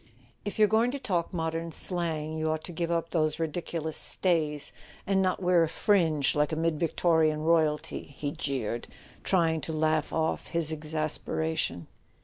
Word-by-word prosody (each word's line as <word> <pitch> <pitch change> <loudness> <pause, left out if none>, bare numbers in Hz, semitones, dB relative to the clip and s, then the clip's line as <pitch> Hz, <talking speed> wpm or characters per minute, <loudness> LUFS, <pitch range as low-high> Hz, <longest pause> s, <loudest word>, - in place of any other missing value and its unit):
"If 205 - -5
you're 215 -1 +6
going 225 +3 +3
to 280 +2 -4
talk 175 -9 -1
modern 165 -1 -3
slang 160 -3 -1
you 160 0 -1
ought 155 0 -2
to - - -8
give 170 0 -2
up 165 -1 -1
those 155 -2 +1
ridiculous 160 -1 -3
stays, 155 -5 +2 0.3
and 195 -1 +2
not 185 0 0
wear 180 -1 +4
a 165 - +3
fringe 160 -5 +2
like 150 +1 +1
a - - 0
mid 160 -1 0
Victorian 160 -2 +2
royalty," 155 -2 +1
he 140 +1 -5
jeered, 120 -6 -3 0.4
trying 165 -4 +2
to 160 - -4
laugh 155 -1 +1
off 160 0 -1
his 165 -2 +2
exasperation. 155 - -2
160 Hz, 160 wpm, -28 LUFS, 155-170 Hz, 0.4 s, you're